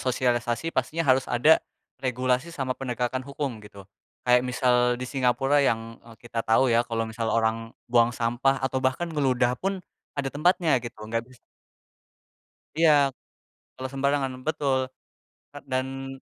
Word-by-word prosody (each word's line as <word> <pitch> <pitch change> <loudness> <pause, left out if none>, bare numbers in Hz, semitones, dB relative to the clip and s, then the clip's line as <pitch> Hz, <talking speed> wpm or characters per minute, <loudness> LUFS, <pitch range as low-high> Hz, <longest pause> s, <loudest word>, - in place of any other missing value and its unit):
sosialisasi 125 +3 0
pastinya 165 +1 -1
harus 130 0 0
ada, 150 +7 +5 0.4
regulasi 130 +3 0
sama 135 -6 -2
penegakan 125 0 -2
hukum 135 -4 -5
gitu. 100 -2 -13 0.4
Kayak 125 0 +5
misal 125 0 +2 0.2
di 125 - -5
Singapura 135 +2 +2
yang 115 -2 -1
eee, 115 -1 -15
kita 120 -1 -5
tahu 115 +3 +3
ya 115 - +5
kalau 115 -1 -1
misalnya 110 0 -2
orang 110 0 +2 0.3
buang 120 0 +3
sampah 125 +4 +1
atau 130 0 -1
bahkan 130 +7 0
ngeludah 125 -4 +1
pun 195 0 -2 0.4
ada 140 -1 -1
tempatnya 165 -1 +3
gitu 120 -1 -8
enggak 115 +1 -2
bisa 130 -1 -18 1.4
Iya. 160 -2 +6 0.8
Kalau 130 0 -5
sembarangan. 140 -1 0 0.2
Betul, 140 -4 +1 0.7
eee, 145 - -10
dan 135 +1 -3
130 Hz, 140 wpm, -26 LUFS, 120-135 Hz, 1.4 s, Iya